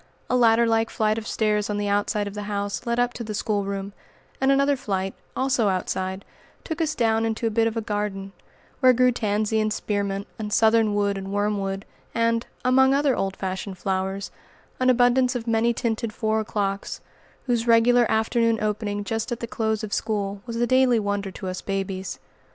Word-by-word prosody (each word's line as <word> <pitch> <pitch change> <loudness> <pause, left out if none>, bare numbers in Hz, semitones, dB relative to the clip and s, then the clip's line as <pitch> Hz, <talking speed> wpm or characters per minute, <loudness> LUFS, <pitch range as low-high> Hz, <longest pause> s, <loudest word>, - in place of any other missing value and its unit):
A - - +3
ladder 235 -1 +5
like 225 0 +2
flight 215 0 0
of 225 - -9
stairs 210 -1 0
on 205 - -1
the 205 0 -1
outside 205 +1 0
of 200 - -6
the 210 - -5
house 200 +2 -3
led 235 0 0
up 245 0 +1
to 240 - -6
the 215 -1 -5
schoolroom, 200 -2 -2 0.5
and 265 +1 +4
another 275 +1 +3
flight, 195 -6 -2 0.2
also 255 -5 +2
outside, 190 +1 -2 0.4
took 325 0 -4
us 315 -2 0
down 225 -2 +2
into 225 +1 -1
a 225 - +1
bit 225 +1 +2
of 230 0 -3
a - - 0
garden, 205 -2 -3 0.5
where 255 -2 +6
grew 250 +1 +4
tansy 215 -1 0
and 215 0 +1
spearmint 200 -2 -2
and 210 -1 -4
southernwood 210 -3 +3
and 195 0 -6
wormwood, 200 -1 -1 0.3
and, 230 0 +1 0.2
among 265 +1 +5
other 280 -2 +2
old 195 0 -2
fashioned 190 0 -4
flowers, 190 +1 -2 0.5
an 255 0 +3
abundance 250 +1 +4
of 235 -2 -3
many 230 0 +2
tinted 230 -1 -2
four 220 0 0
o'clocks, 200 -2 -2 0.4
whose 240 -2 0
regular 235 +1 +5
afternoon 225 0 +2
opening 210 -1 -2
just 225 +4 -3
at 240 - -2
the - - -3
close 220 -1 -1
of 210 - -4
school, 205 -2 -2
was 230 - -4
a 235 +1 +1
daily 255 -1 +4
wonder 205 -1 -2
to 190 0 -7
us 185 0 -4
babies. 190 -1 -3
220 Hz, 185 wpm, -24 LUFS, 200-235 Hz, 0.5 s, where